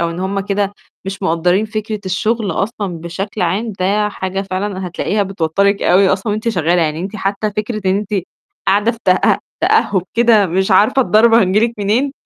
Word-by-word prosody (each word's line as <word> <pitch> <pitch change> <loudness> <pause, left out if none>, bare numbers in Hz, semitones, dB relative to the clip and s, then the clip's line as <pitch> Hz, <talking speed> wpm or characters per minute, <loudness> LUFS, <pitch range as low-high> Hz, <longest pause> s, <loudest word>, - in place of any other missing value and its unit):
أو 170 0 0
إن 170 +2 -6
هُم 195 +1 -1
كده 200 0 -1 0.3
مش 195 +1 -6
مقدّرين 180 +3 +1
فكرة 215 -1 -4
الشغل 215 +3 -1
أصلًا 195 -1 -3
بشكل 190 +5 -4
عام، 205 +6 -1
ده 210 +3 +1
حاجة 190 -1 -4
فعلًا 190 0 -4
هتلاقيها 200 +4 -1
بتوترِك 195 +2 0
أوي 190 +2 +4
أصلًا 195 +3 0
وأنتِ 215 +2 -2
شغالة، 175 -4 +1
يعني 155 0 -1
أنتِ 195 +4 -5
حتّى 200 +1 -2
فكرة 215 +1 -2
إن 190 - +2
أنتِ 200 -3 0 0.4
قاعدة 205 +4 +3
في 230 - -12
تأ 185 0 +3 0.2
تأهب 190 -3 +2
كده 230 -3 +4
مش 190 +3 0
عارفة 210 +8 +4
الضربة 230 0 +4
هتيجي 195 +2 +2
لِك 230 +1 +1
منين، 225 +8 0
200 Hz, 180 wpm, -16 LUFS, 185-215 Hz, 0.4 s, أوي